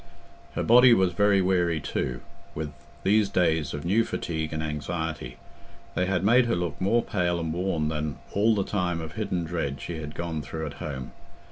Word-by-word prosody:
Her - - 0
body 125 +1 +7
was 95 -3 +2
very 100 +1 +4
weary 90 -3 +2
too 65 -3 -3 0.3
with 75 -1 -4 0.3
these 105 +1 +3
days 80 -5 +1
of 75 +1 -5
new 105 +6 +3
fatigue 80 -7 -3
and 80 0 -2
anxiety; 75 -3 -4 0.6
they 90 - 0
had 95 -2 0
made 120 +4 +5
her 115 - +1
look 85 -4 -3
more 115 +5 +3
pale 90 -3 0
and 80 -1 -2
worn 85 -4 0
than 75 -2 -3 0.2
all 110 +2 +3
the 100 - +1
time 90 -4 -1
of 80 -1 -6
hidden 85 +4 -2
dread 80 -5 -3
she 80 +4 -5
had 75 -1 -7
gone 85 -2 -3
through 80 +2 -5
at 75 - -5
home. 65 -4 -5
85 Hz, 190 wpm, -27 LUFS, 75-95 Hz, 0.6 s, body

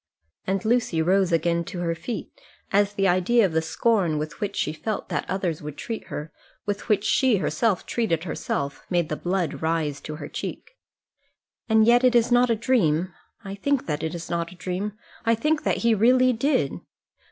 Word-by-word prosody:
And 190 +1 -1
Lucy 225 -7 +1
rose 185 +3 +3
again 170 +1 +1
to 175 - -5
her 170 -1 0
feet, 225 +8 -5 0.4
as 205 +1 +3
the 195 -1 +2
idea 190 +6 +3
of 185 - -1
the 160 0 +1
scorn 170 0 +1
with 155 0 -5
which 205 -1 -2
she 150 - -1
felt 215 +6 -4
that - - -3
others 185 -4 -2
would 150 -1 -7
treat 225 -2 -5
her 150 +1 -6 0.3
with 205 +2 -4
which 205 -1 +3
she 250 0 +3
herself 210 +1 0
treated 170 -9 0
herself 140 -4 -3
made 175 -3 +1
the 155 - -1
blood 175 -2 -2
rise 160 -3 -1
to 155 - -6
her 150 -1 -7
cheek. - - -6 0.9
"And 220 0 +5
yet 240 +2 +5
it 250 -1 +4
is 235 +1 +3
not 245 0 +5
a 230 - +3
dream. 185 - +1 0.3
I 195 - -5
think 275 +7 0
that 150 -2 -2
it 160 +1 -3
is 170 - -6
not 170 -1 -2
a - - -12
dream. 185 +3 -3 0.3
I 230 0 +3
think 300 +6 +1
that - - +2
he 230 - +5
really 250 +4 +4
did." 245 - +1
190 Hz, 195 wpm, -25 LUFS, 165-230 Hz, 0.9 s, And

